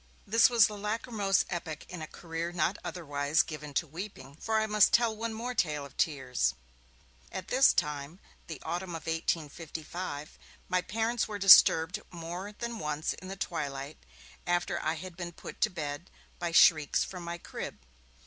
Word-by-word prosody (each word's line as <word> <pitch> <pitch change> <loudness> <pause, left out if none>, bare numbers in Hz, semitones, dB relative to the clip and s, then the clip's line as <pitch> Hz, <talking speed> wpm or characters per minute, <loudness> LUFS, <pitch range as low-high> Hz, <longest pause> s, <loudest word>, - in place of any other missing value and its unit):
This 230 +4 +5
was 235 -3 +6
the 210 -1 -4
lachrymose 210 -2 0
epoch 165 -4 -5
in 180 -2 -7
a 155 - -5
career 165 +1 -5
not 175 +3 0
otherwise 145 -2 0
given 150 -1 -7
to 165 - +2
weeping, 155 -4 -8
for 220 +4 0
I 220 - +1
must 210 -1 +4
tell 235 -2 +4
one 225 +1 -3
more 235 +3 -4
tale 155 -10 0
of 140 - -14
tears. 125 - 0 0.8
About 185 -1 -6
this 265 +2 +6
time, 150 +2 -2 0.3
the 160 - -6
autumn 175 +2 -3
of 165 - -7
1855, 160 -1 -4 0.3
my 180 0 +1
parents 225 +4 -1
were 210 - -4
disturbed 180 -3 +7
more 175 +3 -6
than 235 +2 -5
once 150 0 -2
in 185 - -11
the 195 - -5
twilight, 145 -5 -4 0.5
after 175 0 0
I 155 +1 0
had 185 +1 -8
been 175 -1 -6
put - - -10
to - - +4
bed, 155 -2 -5 0.3
by 175 -1 -2
shrieks 155 -3 +5
from 180 -2 -7
my 170 0 -5
crib. - - -7
175 Hz, 170 wpm, -30 LUFS, 155-205 Hz, 0.8 s, disturbed